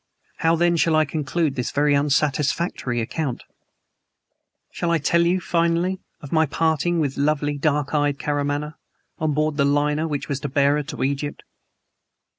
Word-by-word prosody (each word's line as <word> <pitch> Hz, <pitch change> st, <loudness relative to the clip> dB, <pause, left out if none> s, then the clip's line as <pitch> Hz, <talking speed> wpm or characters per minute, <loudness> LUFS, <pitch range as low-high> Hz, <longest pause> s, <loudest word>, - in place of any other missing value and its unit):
How, 165 Hz, 0 st, +2 dB
then, 170 Hz, +1 st, +2 dB
shall 160 Hz, 0 st, +3 dB
I 155 Hz, 0 st, +4 dB
conclude 150 Hz, +1 st, -1 dB
this 125 Hz, -3 st, -2 dB
very 145 Hz, 0 st, +2 dB
unsatisfactory 140 Hz, -2 st, 0 dB
account? 135 Hz, +2 st, -3 dB, 1.3 s
Shall 170 Hz, -, -2 dB
I 170 Hz, -, +3 dB
tell 170 Hz, +3 st, +2 dB
you, 180 Hz, +2 st, +2 dB
finally, 170 Hz, +2 st, 0 dB, 0.2 s
of 145 Hz, -, -10 dB
my 160 Hz, -1 st, +3 dB
parting 165 Hz, +3 st, +1 dB
with 140 Hz, -4 st, -1 dB
lovely, 145 Hz, 0 st, +1 dB
dark 145 Hz, -1 st, 0 dB
eyed 145 Hz, -1 st, +1 dB
Karamaneh, 145 Hz, +1 st, -2 dB, 0.5 s
on 155 Hz, -1 st, 0 dB
board 155 Hz, 0 st, 0 dB
the 140 Hz, -, +3 dB
liner 150 Hz, +2 st, +1 dB
which 145 Hz, -3 st, -3 dB
was 140 Hz, -2 st, -2 dB
to 145 Hz, 0 st, -4 dB
bear 140 Hz, +1 st, +3 dB
her 150 Hz, -, -1 dB
to 150 Hz, -, -4 dB
Egypt? 140 Hz, +2 st, -2 dB
150 Hz, 160 wpm, -23 LUFS, 140-160 Hz, 1.3 s, I